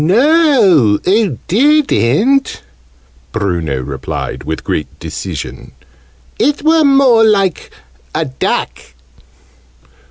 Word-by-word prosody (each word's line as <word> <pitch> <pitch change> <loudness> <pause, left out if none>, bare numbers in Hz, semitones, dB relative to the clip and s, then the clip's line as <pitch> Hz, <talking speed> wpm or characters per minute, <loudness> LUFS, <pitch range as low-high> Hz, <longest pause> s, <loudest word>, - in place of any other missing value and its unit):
"No, 215 - +3
oo 195 - +1
didn't," 265 - +1 0.7
Bruno 85 -10 -2
replied 65 0 -6
with 80 +1 -5
great 75 - -3
decision. - - -7 0.7
"It 290 +3 0
were 320 0 +3
more 270 -5 +4
like 195 -5 +1 0.5
a 160 +1 0
duck." 130 -2 -3
195 Hz, 85 wpm, -14 LUFS, -, 0.7 s, more